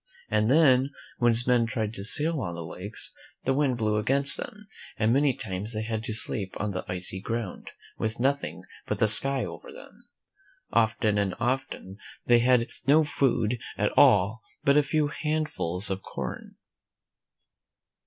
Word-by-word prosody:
And 110 Hz, +1 st, +2 dB
then, 135 Hz, -3 st, +4 dB, 0.3 s
when 120 Hz, -, +4 dB
his 115 Hz, +1 st, +2 dB
men 120 Hz, -2 st, +3 dB
tried 110 Hz, -2 st, -3 dB
to 100 Hz, -, -7 dB
sail 150 Hz, +7 st, +1 dB
on 85 Hz, -5 st, -4 dB
the 85 Hz, -1 st, -6 dB
lakes, 95 Hz, +6 st, -4 dB, 0.3 s
the 135 Hz, -, +1 dB
wind 135 Hz, -3 st, +1 dB
blew 105 Hz, -2 st, 0 dB
against 140 Hz, +6 st, +2 dB
them, 210 Hz, 0 st, -8 dB, 0.3 s
and 110 Hz, +1 st, +2 dB
many 140 Hz, +1 st, +3 dB
times 100 Hz, +2 st, -4 dB
they 110 Hz, 0 st, -3 dB
had 110 Hz, 0 st, -3 dB
to 115 Hz, -, -3 dB
sleep 100 Hz, -3 st, 0 dB
on 105 Hz, 0 st, -2 dB
the 95 Hz, -, -4 dB
icy 90 Hz, +1 st, -2 dB
ground, 115 Hz, -2 st, -5 dB, 0.3 s
with 110 Hz, +1 st, -2 dB
nothing 140 Hz, +3 st, -1 dB, 0.2 s
but -, -, -2 dB
the -, -, +3 dB
sky 135 Hz, +5 st, +5 dB
over -, -, -9 dB
them. -, -, -14 dB, 0.7 s
Often 110 Hz, -2 st, +2 dB
and 100 Hz, -2 st, -1 dB
often 120 Hz, -6 st, -3 dB, 0.3 s
they 120 Hz, -1 st, +5 dB
had 125 Hz, 0 st, +3 dB, 0.2 s
no 155 Hz, +3 st, +6 dB
food 125 Hz, -5 st, 0 dB, 0.2 s
at -, -, 0 dB
all 105 Hz, +3 st, +4 dB, 0.2 s
but 140 Hz, -, +4 dB
a 150 Hz, -, +6 dB
few 145 Hz, +1 st, 0 dB
handfuls 150 Hz, -, -2 dB
of 95 Hz, 0 st, -3 dB
corn. -, -, -7 dB
115 Hz, 165 wpm, -27 LUFS, 105-135 Hz, 0.7 s, no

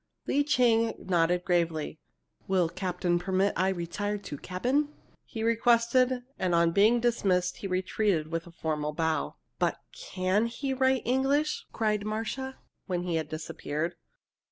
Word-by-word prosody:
Lee 290 Hz, -, +2 dB
Ching 235 Hz, -5 st, +3 dB
nodded 175 Hz, 0 st, +1 dB
gravely. 165 Hz, -4 st, 0 dB, 0.5 s
"Will 185 Hz, -3 st, +2 dB
captain 180 Hz, -1 st, -1 dB
permit 190 Hz, +2 st, +1 dB
I 185 Hz, +2 st, +2 dB
retire 195 Hz, +3 st, -2 dB
to 200 Hz, -7 st, -7 dB
cabin?" 255 Hz, +11 st, 0 dB, 0.3 s
he 225 Hz, -2 st, -5 dB
requested, 240 Hz, +2 st, +3 dB, 0.2 s
and 180 Hz, -2 st, +1 dB
on 170 Hz, 0 st, +4 dB
being 215 Hz, +6 st, +4 dB
dismissed, 195 Hz, -7 st, +1 dB
he 195 Hz, -, -5 dB
retreated 185 Hz, -3 st, 0 dB
with 165 Hz, +1 st, -3 dB
a -, -, -11 dB
formal 150 Hz, -2 st, -2 dB
bow. 160 Hz, 0 st, -1 dB, 0.2 s
"But -, -, +1 dB
can 210 Hz, -, 0 dB
he 265 Hz, +3 st, -3 dB
write 260 Hz, -1 st, +2 dB
English?" 270 Hz, +4 st, +1 dB
cried 215 Hz, -2 st, 0 dB
Marcia, 225 Hz, +5 st, -3 dB, 0.3 s
when 180 Hz, -2 st, -1 dB
he 175 Hz, -2 st, -1 dB
had 155 Hz, -2 st, -3 dB
disappeared. 155 Hz, +1 st, -3 dB
190 Hz, 140 wpm, -29 LUFS, 175-235 Hz, 0.5 s, on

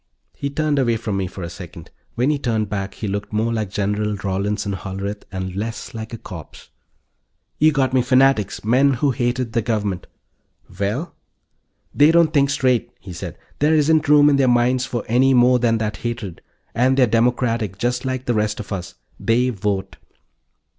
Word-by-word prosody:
He 140 Hz, -, -4 dB
turned 150 Hz, 0 st, 0 dB
away 120 Hz, -3 st, +2 dB
from 110 Hz, -3 st, -3 dB
me 95 Hz, -1 st, -1 dB
for 90 Hz, +1 st, -8 dB
a 85 Hz, -, -4 dB
second. 90 Hz, -2 st, -10 dB, 0.2 s
When 125 Hz, +5 st, +2 dB
he 145 Hz, -, -1 dB
turned 110 Hz, -5 st, -1 dB
back 95 Hz, -1 st, -4 dB
he 110 Hz, -, -5 dB
looked 100 Hz, +1 st, -4 dB
more 110 Hz, +2 st, 0 dB
like 110 Hz, -3 st, -2 dB
General 105 Hz, +1 st, -1 dB
Rawlinson 100 Hz, +1 st, -2 dB
Hollerith, 100 Hz, +2 st, -5 dB
and 95 Hz, -1 st, -5 dB
less 110 Hz, +3 st, -5 dB
like 110 Hz, -1 st, -6 dB
a 115 Hz, -, -5 dB
corpse. 90 Hz, -, -11 dB, 0.9 s
"You 155 Hz, +1 st, +5 dB
got 135 Hz, -3 st, 0 dB
me 130 Hz, -, +4 dB
fanatics, 130 Hz, -4 st, +2 dB
men 130 Hz, +5 st, +3 dB
who 140 Hz, +3 st, +1 dB
hated 120 Hz, -1 st, -1 dB
the 115 Hz, -, +2 dB
Government." 105 Hz, -5 st, -2 dB, 0.7 s
"Well?" 115 Hz, -, -2 dB, 0.8 s
"They 145 Hz, +2 st, +5 dB
don't 165 Hz, -1 st, +4 dB
think 140 Hz, -2 st, +3 dB
straight," 130 Hz, -4 st, +1 dB
he 95 Hz, -2 st, -10 dB
said. 85 Hz, 0 st, -7 dB, 0.2 s
"There 150 Hz, +2 st, +3 dB
isn't 155 Hz, 0 st, +3 dB
room 150 Hz, -1 st, +7 dB
in 145 Hz, -1 st, +4 dB
their 135 Hz, -1 st, +3 dB
minds 125 Hz, +1 st, +2 dB
for 120 Hz, -3 st, -3 dB
any 130 Hz, +3 st, +4 dB
more 125 Hz, 0 st, +5 dB
than 115 Hz, -1 st, +2 dB
that 110 Hz, -1 st, -3 dB
hatred. 115 Hz, -7 st, -5 dB, 0.3 s
And 130 Hz, +2 st, +2 dB
they're 130 Hz, -, +6 dB
democratic, 115 Hz, -3 st, 0 dB
just 120 Hz, +3 st, -1 dB
like 130 Hz, -1 st, -3 dB
the 120 Hz, -, +1 dB
rest 105 Hz, -1 st, 0 dB
of 105 Hz, -, -8 dB
us. 90 Hz, -3 st, -6 dB, 0.2 s
They 125 Hz, +3 st, +2 dB
vote." 100 Hz, -2 st, -3 dB
115 Hz, 180 wpm, -21 LUFS, 105-130 Hz, 0.9 s, room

